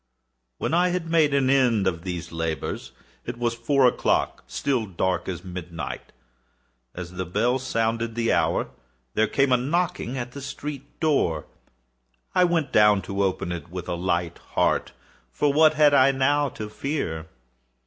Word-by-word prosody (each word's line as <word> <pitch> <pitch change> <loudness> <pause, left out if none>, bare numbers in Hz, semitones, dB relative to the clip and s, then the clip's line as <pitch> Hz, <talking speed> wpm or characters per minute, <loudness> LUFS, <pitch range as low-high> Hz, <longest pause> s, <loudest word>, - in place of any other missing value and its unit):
When - - -2
I 175 +2 +4
had 175 -2 -2
made 160 -3 +4
an 140 -2 +2
end 125 -6 +3
of 85 -3 0
these 90 -2 -5
labors, 80 -1 -3 0.3
it 120 0 -6
was 120 -1 0
four 130 +3 +2
o'clock—still 125 0 0
dark 95 0 -1
as 90 -1 -5
midnight. 90 -2 -6 0.8
As 90 -1 -6
the 90 0 -4
bell 115 +8 +1
sounded 115 -2 -1
the 115 -1 +1
hour, - - +1 0.4
there 110 0 +2
came 135 -1 +2
a 125 - +6
knocking 135 -2 -1
at 120 -1 -4
the 140 - -8
street 140 0 -7
door. 135 - +1 0.9
I 180 - +5
went 165 -5 0
down 105 -2 +5
to 100 0 -3
open 95 -2 -1
it 85 -1 -6
with 90 0 -6
a - - -2
light 85 -1 -1 0.2
heart,—for 100 - -1
what 155 +1 +5
had 150 -1 +5
I 135 0 +6
now 145 +2 +2
to 110 -3 -7
fear? 105 - -3
120 Hz, 155 wpm, -25 LUFS, 90-140 Hz, 0.9 s, a